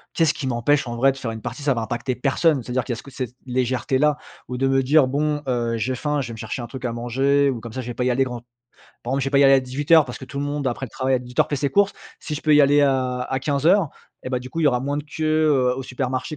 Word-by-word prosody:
Qu'est-ce 160 Hz, -2 st, +3 dB
qui 140 Hz, -, -5 dB
m'empêche 130 Hz, +3 st, +1 dB
en 120 Hz, -, -4 dB
vrai 135 Hz, +3 st, +4 dB
de 135 Hz, -, -10 dB
faire 125 Hz, -4 st, -4 dB
une 110 Hz, 0 st, -6 dB
partie? 150 Hz, -, -6 dB
Ça 140 Hz, -2 st, +1 dB
va 115 Hz, -, -2 dB
impacter 120 Hz, +2 st, -3 dB
personne, 135 Hz, +2 st, +1 dB
c'est-à-dire 125 Hz, +1 st, -2 dB
qui 125 Hz, -, -5 dB
y -, -, +1 dB
a -, -, -3 dB
ce -, -, -10 dB
co 140 Hz, -, -13 dB
cette 125 Hz, -1 st, -5 dB
légèreté-là, 130 Hz, +3 st, +1 dB, 0.3 s
ou 125 Hz, -, -5 dB
de 135 Hz, +1 st, +1 dB
me 135 Hz, 0 st, +3 dB
dire: 145 Hz, +2 st, +4 dB
«Bon, 150 Hz, +2 st, -1 dB
heu, 120 Hz, -2 st, 0 dB
j'ai 120 Hz, +4 st, -1 dB
faim, 150 Hz, +3 st, -1 dB
je 125 Hz, -4 st, -4 dB
vais -, -, -6 dB
me 110 Hz, -, -9 dB
chercher 120 Hz, +2 st, -5 dB
un 120 Hz, -, -6 dB
truc 130 Hz, +2 st, -9 dB
à 120 Hz, -, -1 dB
manger, 135 Hz, +4 st, +1 dB
ou 120 Hz, -, -5 dB
comme 115 Hz, 0 st, -9 dB
ça 130 Hz, -, -4 dB
je 120 Hz, -, -9 dB
vais 120 Hz, -, -4 dB
pas 125 Hz, -, -2 dB
y 125 Hz, -, +2 dB
aller 130 Hz, +2 st, +2 dB
grand 125 Hz, -2 st, -5 dB, 0.6 s
par 120 Hz, -, -5 dB
contre 135 Hz, +1 st, 0 dB
je -, -, -3 dB
vais 135 Hz, -, -2 dB
pas 140 Hz, -, +4 dB
y 140 Hz, -, +6 dB
aller 135 Hz, 0 st, +7 dB
à 135 Hz, -, +6 dB
18:00 145 Hz, +5 st, +3 dB
parce 125 Hz, -, -8 dB
que 130 Hz, -, -8 dB
tout 140 Hz, -, -8 dB
le 140 Hz, -, -1 dB
monde 145 Hz, -2 st, -2 dB
après 125 Hz, +2 st, -3 dB
le -, -, -14 dB
travail 130 Hz, 0 st, 0 dB
à -, -, 0 dB
18:00 125 Hz, 0 st, -1 dB
fait 145 Hz, -, 0 dB
ses 140 Hz, +1 st, -1 dB
courses. 200 Hz, 0 st, +3 dB, 0.3 s
Si 150 Hz, -, -5 dB
je -, -, -6 dB
peux 155 Hz, -, +3 dB
y 150 Hz, -, +7 dB
aller 145 Hz, +1 st, +5 dB
à 130 Hz, -2 st, +1 dB
à 130 Hz, +1 st, -2 dB
15:00 155 Hz, +6 st, +2 dB, 0.3 s
et 130 Hz, -, -5 dB
bah, 125 Hz, -, -1 dB
du 130 Hz, +1 st, -9 dB
coup 165 Hz, -, -4 dB
il -, -, +1 dB
y 150 Hz, -, +6 dB
aura 125 Hz, -2 st, +2 dB
moins 140 Hz, +1 st, -2 dB
de 145 Hz, -, -4 dB
queue, 155 Hz, +1 st, -6 dB, 0.3 s
heu, 125 Hz, -3 st, +2 dB
au 135 Hz, -, -4 dB
supermarché» 130 Hz, +3 st, -3 dB
130 Hz, 325 wpm, -22 LUFS, 125-145 Hz, 0.6 s, aller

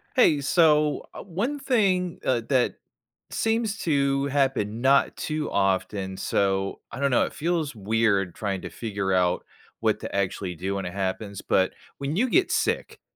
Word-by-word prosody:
Hey, 155 Hz, -, +5 dB
so, 150 Hz, 0 st, +3 dB
uh, -, -, -7 dB
one 205 Hz, -, -2 dB
thing, 195 Hz, -, +1 dB
uh, 125 Hz, -2 st, +1 dB
that 130 Hz, -3 st, +2 dB, 0.6 s
seems 225 Hz, -1 st, 0 dB
to 140 Hz, -3 st, +1 dB
happen 135 Hz, -6 st, 0 dB
not 135 Hz, +2 st, +3 dB
too 155 Hz, -1 st, -2 dB
often, 95 Hz, 0 st, 0 dB
so 95 Hz, 0 st, 0 dB
I -, -, -7 dB
don't 140 Hz, 0 st, +1 dB
know, 125 Hz, -, +4 dB
it -, -, -6 dB
feels 160 Hz, -2 st, -1 dB
weird 100 Hz, -3 st, +1 dB
trying 100 Hz, -4 st, -3 dB
to 90 Hz, -, -6 dB
figure 100 Hz, 0 st, -3 dB
out 90 Hz, -1 st, +2 dB, 0.4 s
what -, -, +1 dB
to -, -, -6 dB
actually 95 Hz, -1 st, -1 dB
do 95 Hz, +4 st, -3 dB
when 95 Hz, -2 st, -3 dB
it 90 Hz, -, -6 dB
happens, 100 Hz, +1 st, -3 dB
but 95 Hz, 0 st, +2 dB, 0.3 s
when 140 Hz, +3 st, -3 dB
you 250 Hz, +5 st, +2 dB
get 370 Hz, +7 st, +3 dB
sick, -, -, -1 dB
130 Hz, 165 wpm, -25 LUFS, 95-155 Hz, 0.6 s, Hey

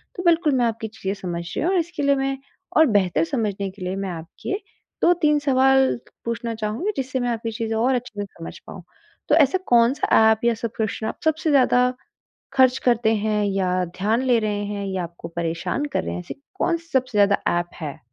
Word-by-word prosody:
तो 360 Hz, -, -5 dB
बिल्कुल, 330 Hz, -4 st, +3 dB
मैं 245 Hz, -2 st, +2 dB
आपकी 225 Hz, 0 st, -2 dB
चीज़ें 205 Hz, -3 st, -4 dB
समझ 170 Hz, -2 st, -3 dB
रही -, -, -1 dB
हूँ, 365 Hz, -, +2 dB
और 365 Hz, -, +3 dB
इसके 330 Hz, -3 st, -3 dB
लिए 280 Hz, 0 st, +4 dB
मैं 270 Hz, 0 st, -1 dB, 0.4 s
और 315 Hz, -, +7 dB
बेहतर 180 Hz, -4 st, +1 dB
समझने 200 Hz, +1 st, -2 dB
के 190 Hz, -1 st, -17 dB
लिए 185 Hz, +1 st, -2 dB
मैं 195 Hz, -1 st, -3 dB
आपके 170 Hz, -, -5 dB, 0.4 s
2-3 320 Hz, -4 st, +4 dB
सवाल 265 Hz, -1 st, +3 dB, 0.3 s
पूछना 235 Hz, 0 st, -3 dB
चाहूँगी 220 Hz, -, -2 dB
जिससे 260 Hz, -1 st, -2 dB
मैं 245 Hz, 0 st, -1 dB
आपकी 230 Hz, -1 st, -2 dB
चीज़ें 225 Hz, 0 st, -3 dB
और 250 Hz, +4 st, +2 dB
अच्छे 240 Hz, -4 st, -5 dB
से -, -, -3 dB
समझ 165 Hz, -4 st, -10 dB
पाऊँ। -, -, -9 dB, 0.5 s
तो -, -, +5 dB
ऐसा 295 Hz, +3 st, +4 dB
कौन-सा 240 Hz, +3 st, +3 dB, 0.2 s
ऐप 220 Hz, +1 st, -1 dB
या 235 Hz, -, +4 dB
सब्सक्रिप्शन 220 Hz, -1 st, -3 dB
आप -, -, -5 dB
सबसे 315 Hz, 0 st, +1 dB
ज़्यादा 250 Hz, -2 st, +4 dB, 0.6 s
खर्च 260 Hz, -1 st, +4 dB
करते 230 Hz, -2 st, +3 dB
हैं 210 Hz, 0 st, 0 dB
या 185 Hz, -2 st, 0 dB
ध्यान 220 Hz, +6 st, +1 dB
ले 245 Hz, -2 st, +4 dB
रहे 205 Hz, -1 st, -2 dB
हैं 200 Hz, -1 st, -4 dB
या 190 Hz, -2 st, -2 dB
आपको 170 Hz, 0 st, -8 dB
परेशान 170 Hz, -, -2 dB
कर -, -, 0 dB
रहे 85 Hz, -, -3 dB
हैं, 90 Hz, -, -4 dB
ऐसी -, -, -8 dB, 0.2 s
कौन-सी 335 Hz, -3 st, -1 dB
सबसे 255 Hz, -5 st, +1 dB
ज़्यादा 200 Hz, 0 st, +4 dB, 0.2 s
ऐप 175 Hz, 0 st, -4 dB
है? 155 Hz, 0 st, -5 dB
230 Hz, 200 wpm, -23 LUFS, 195-265 Hz, 0.6 s, और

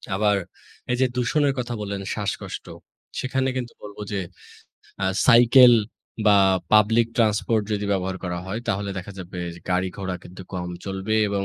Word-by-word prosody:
আবার 105 Hz, 0 st, +2 dB, 0.5 s
এই 125 Hz, -, +1 dB
যে, -, -, +5 dB
দূষণের 140 Hz, +3 st, +1 dB
কথা 120 Hz, -1 st, -3 dB
বললেন, 100 Hz, -1 st, -4 dB
শ্বাসকষ্ট, 105 Hz, -2 st, -4 dB, 0.5 s
সেখানে 130 Hz, 0 st, 0 dB
কিন্তু 120 Hz, -2 st, -4 dB
বলব 105 Hz, -1 st, -10 dB
যে, 100 Hz, -, -1 dB, 0.8 s
আ -, -, +2 dB, 0.2 s
সাইকেল 120 Hz, +1 st, +8 dB, 0.5 s
বা 105 Hz, -1 st, +7 dB, 0.4 s
পাবলিক 110 Hz, +2 st, +5 dB
ট্রান্সপোর্ট 110 Hz, 0 st, +2 dB
যদি 105 Hz, -1 st, -1 dB
ব্যবহার 95 Hz, -1 st, -1 dB
করা 90 Hz, -1 st, -3 dB
হয় 105 Hz, +5 st, -3 dB
তাহলে 100 Hz, -2 st, -1 dB
দেখা 90 Hz, +2 st, -8 dB
যাবে 90 Hz, 0 st, -8 dB, 0.3 s
গাড়ি 90 Hz, +1 st, +1 dB
ঘোড়া 95 Hz, -2 st, -3 dB
কিন্তু 95 Hz, +1 st, -10 dB
কম 90 Hz, -1 st, -4 dB, 0.2 s
চলবে 95 Hz, +2 st, -2 dB
এবং 100 Hz, -1 st, -1 dB
105 Hz, 150 wpm, -24 LUFS, 95-120 Hz, 0.8 s, সাইকেল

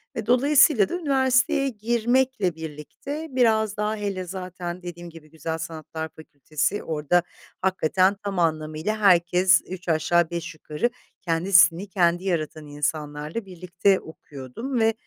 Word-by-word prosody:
ve -, -, -4 dB
dolayısıyla 265 Hz, -3 st, +4 dB
da -, -, -5 dB
üniversiteye 275 Hz, -2 st, +2 dB
girmekle 235 Hz, -3 st, 0 dB
birlikte 160 Hz, -, -7 dB
biraz 220 Hz, -4 st, +2 dB
daha 210 Hz, +1 st, -1 dB
hele 200 Hz, -3 st, -3 dB
zaten 180 Hz, -1 st, -6 dB
dediğim 175 Hz, 0 st, -8 dB
gibi 160 Hz, -2 st, -14 dB
Güzel 160 Hz, +1 st, -4 dB
Sanatlar 160 Hz, 0 st, -6 dB
Fakültesi 155 Hz, +4 st, -3 dB
orada 160 Hz, +3 st, +1 dB, 0.4 s
hakikaten 190 Hz, +1 st, +2 dB
tam 195 Hz, -2 st, -3 dB
anlamıyla 155 Hz, +4 st, -1 dB
herkes 185 Hz, -1 st, +4 dB
üç 180 Hz, -1 st, -7 dB
aşağı 165 Hz, +1 st, +2 dB
beş 170 Hz, -1 st, -5 dB
yukarı 155 Hz, +7 st, -2 dB, 0.3 s
kendi 175 Hz, +3 st, -2 dB
stilini 180 Hz, +1 st, +6 dB
kendi 175 Hz, -1 st, +1 dB
yaratan 155 Hz, -4 st, -3 dB
insanlarla 150 Hz, +6 st, -3 dB
birlikte 185 Hz, +1 st, 0 dB
okuyordum 160 Hz, -, -7 dB
ve, 225 Hz, 0 st, +3 dB
180 Hz, 125 wpm, -24 LUFS, 160-215 Hz, 0.4 s, stilini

